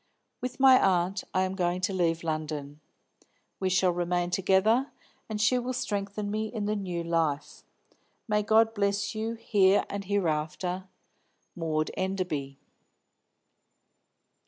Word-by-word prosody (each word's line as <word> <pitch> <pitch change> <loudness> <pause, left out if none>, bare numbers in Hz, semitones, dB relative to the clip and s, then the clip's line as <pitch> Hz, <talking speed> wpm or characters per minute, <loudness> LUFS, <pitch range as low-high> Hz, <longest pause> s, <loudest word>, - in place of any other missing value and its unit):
With 250 +1 -5
my 265 -1 +7
aunt 185 0 +1
I 185 - +2
am 185 0 -2
going 180 -1 0
to 195 +1 0
leave 165 -3 0
London. 155 -2 -4 0.8
We 190 - 0
shall 185 0 +3
remain 175 0 -1
together, 195 +8 +2 0.4
and 215 -1 -3
she 230 +4 +3
will 250 +1 -3
strengthen 205 -3 -3
me 215 +1 -1
in 215 -2 -4
the 210 +1 0
new 180 -4 -3
life. 155 -3 -1 0.7
May 210 -1 +2
God 220 +1 +4
bless 200 0 0
you 225 +1 -3
here 200 -3 +3
and 200 -1 -4
hereafter. 180 -1 -1 0.7
MAUD 155 -2 -1
ENDERBY." 180 -8 -3
190 Hz, 130 wpm, -28 LUFS, 170-210 Hz, 0.8 s, my